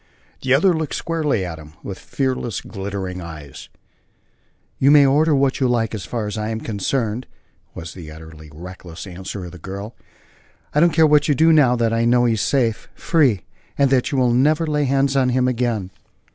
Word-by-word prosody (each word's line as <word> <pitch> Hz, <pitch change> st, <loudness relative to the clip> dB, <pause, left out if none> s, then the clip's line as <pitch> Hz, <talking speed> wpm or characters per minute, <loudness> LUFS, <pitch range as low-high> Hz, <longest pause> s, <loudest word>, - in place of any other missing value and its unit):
The 130 Hz, 0 st, +3 dB
other 180 Hz, +6 st, +4 dB
looked 160 Hz, -3 st, -3 dB
squarely 155 Hz, -, -1 dB
at 80 Hz, -2 st, -6 dB
him, 75 Hz, -1 st, -13 dB
with 95 Hz, -, -7 dB
fearless, 130 Hz, -5 st, -2 dB
glittering 95 Hz, -2 st, -5 dB
eyes: 75 Hz, -5 st, -10 dB, 1.1 s
"You 135 Hz, -, +4 dB
may 145 Hz, -1 st, +7 dB
order 150 Hz, +3 st, +3 dB
what 135 Hz, -1 st, +1 dB
you 130 Hz, -, +2 dB
like 115 Hz, -2 st, 0 dB
so 110 Hz, -, -3 dB
far 110 Hz, +3 st, -4 dB
as 105 Hz, +1 st, -4 dB
I'm 110 Hz, +1 st, -3 dB
concerned," 110 Hz, +2 st, -2 dB, 0.5 s
was 80 Hz, 0 st, -7 dB
the 85 Hz, -4 st, -10 dB
utterly 80 Hz, 0 st, -12 dB
reckless 85 Hz, +2 st, -10 dB
answer 95 Hz, +1 st, -7 dB
of 90 Hz, -, -9 dB
the 90 Hz, -, -12 dB
girl. 100 Hz, +5 st, -7 dB, 0.8 s
"I 150 Hz, -, +2 dB
don't 170 Hz, +2 st, +5 dB
care 160 Hz, -1 st, +4 dB
what 150 Hz, -1 st, +4 dB
you 145 Hz, -, +3 dB
do 160 Hz, +4 st, +5 dB
now 135 Hz, -6 st, +5 dB
that 115 Hz, -1 st, 0 dB
I 115 Hz, 0 st, +1 dB
know 120 Hz, +1 st, +4 dB
he 115 Hz, -, +2 dB
is 110 Hz, -, -1 dB
safe 120 Hz, -6 st, 0 dB
free 140 Hz, -, +2 dB, 0.4 s
and 140 Hz, -1 st, +3 dB
that 130 Hz, -2 st, +2 dB
you 140 Hz, -, -1 dB
will 125 Hz, -2 st, +3 dB
never 150 Hz, +6 st, +3 dB
lay 150 Hz, -2 st, 0 dB
hands 135 Hz, +1 st, +1 dB
on 130 Hz, -2 st, +3 dB
him 125 Hz, 0 st, +2 dB
again." 115 Hz, -6 st, -1 dB
120 Hz, 195 wpm, -21 LUFS, 95-140 Hz, 1.1 s, may